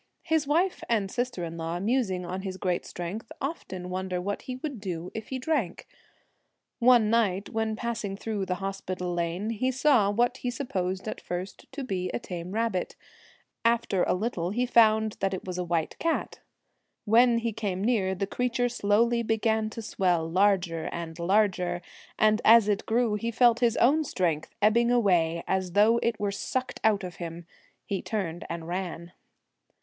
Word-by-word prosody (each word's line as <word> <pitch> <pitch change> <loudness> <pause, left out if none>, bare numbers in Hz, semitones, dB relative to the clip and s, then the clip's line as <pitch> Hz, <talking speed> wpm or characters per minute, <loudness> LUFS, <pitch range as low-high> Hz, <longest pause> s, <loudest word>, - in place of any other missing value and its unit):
His 320 -3 +1
wife 345 +6 +1
and 205 -5 +1
sister 245 -6 -2
in 165 0 -5
law, 165 +1 -3
musing 200 -4 0
on 185 +2 -4
his 190 -1 -5
great 180 -2 -1
strength, 190 +7 -6
25 - - -41
The - - -1 0.3
often 180 0 -6
wonder 185 0 -2
what 200 +3 -3
he 255 - -6
would 260 -4 -6
do 180 -3 -5
if 220 -1 -6
he 265 - -4
Celtic 255 - -9
Twilight, - - +5
drank. - - -14 0.9
One 240 -3 +5
night 200 -4 +1
when 220 -1 -1
passing 225 -4 -3
through 205 -3 -3
the 180 - 0
Hospital 185 -1 -4
Lane, 175 +5 -2
he 230 +4 0
saw 260 -5 +3
what 240 +4 +1
he 250 - -3
sup 255 +1 -5
posed 185 0 -2
at - - -5
first 180 +2 -6
to 275 0 -4
be 185 -7 -2
a - - -2
tame 180 -4 -6
rabbit; 220 -4 -1 0.7
after 230 -5 +2
a - - +2
little 180 -4 -2
he 240 +6 0
found 220 -3 +4
that 195 0 0
it - - -8
was 180 -1 -4
a - - 0
white 170 -2 -2
cat. 330 0 -1 0.7
When 235 +2 +5
he 230 -1 -1
came 200 -3 -3
near, 205 -5 +1
the 195 - -1
creature 245 +3 0
slowly 235 +1 +2
began 220 -1 +1
to 225 +1 -7
swell 180 -6 +1
larger 180 -2 +2
and 170 -1 -6
larger, 180 -1 +2 0.4
and 215 +1 +3
as 225 -1 +7
it 205 -1 0
grew 230 -1 +2
he 230 +3 -1
felt 235 0 +4
his 240 -2 +2
own 295 +6 +4
strength 170 - -1
ebbing 235 +3 +4
away, 175 -8 +2
as 190 -2 -1
though 215 +4 +5
it 230 -2 0
were 205 -1 0
sucked 255 +5 -3
out 215 -2 +3
of 180 -2 -7
him. 170 0 -7 0.4
He 195 -2 -2
turned 180 -6 -3
and 165 -1 -5
ran. 175 -1 -4
205 Hz, 185 wpm, -27 LUFS, 180-235 Hz, 0.9 s, as